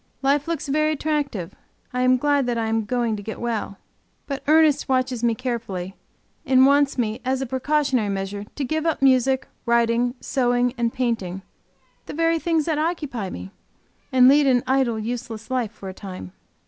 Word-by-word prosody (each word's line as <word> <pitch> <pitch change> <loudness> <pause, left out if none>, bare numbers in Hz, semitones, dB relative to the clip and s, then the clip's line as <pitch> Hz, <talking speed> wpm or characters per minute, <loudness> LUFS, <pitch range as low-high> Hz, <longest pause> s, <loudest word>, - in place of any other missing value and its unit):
Life 280 +2 +2
looks 325 -3 -3
very 305 +2 +2
attractive. 285 - -2 0.4
I 250 - 0
am 255 0 +4
glad 285 0 +1
that 240 -1 0
I 225 - 0
am 220 -1 0
going 235 0 0
to - - -7
get 220 +2 -7
well. 225 -4 -3 0.5
But 275 -1 -4
Ernest 310 -2 +4
watches 255 -2 0
me 235 -1 +2
carefully, 220 -7 -4 0.5
and 260 -3 +5
want 280 0 +3
me, 230 0 -1
as 260 0 0
a 270 - -2
precautionary 260 -3 0
measure, 200 +1 -4
to 290 - -3
give 315 +4 -1
up 320 -4 0
music, 265 0 +3 0.2
writing, 235 +1 +2
sewing, 245 -1 +1
and 235 -2 0
painting 200 -8 -2 0.6
the - - -6
very 330 +1 +2
things 325 -2 +1
that 315 -3 0
occupy 295 - -2
me! 90 - -8 0.6
and 255 -1 +6
lead 285 +1 +5
an 250 -2 +3
idle, 260 -3 +1
useless 230 0 -5
life, 245 -5 -1
for 200 -3 -10
a 190 - -6
time. 185 - -8
250 Hz, 175 wpm, -23 LUFS, 225-280 Hz, 0.6 s, and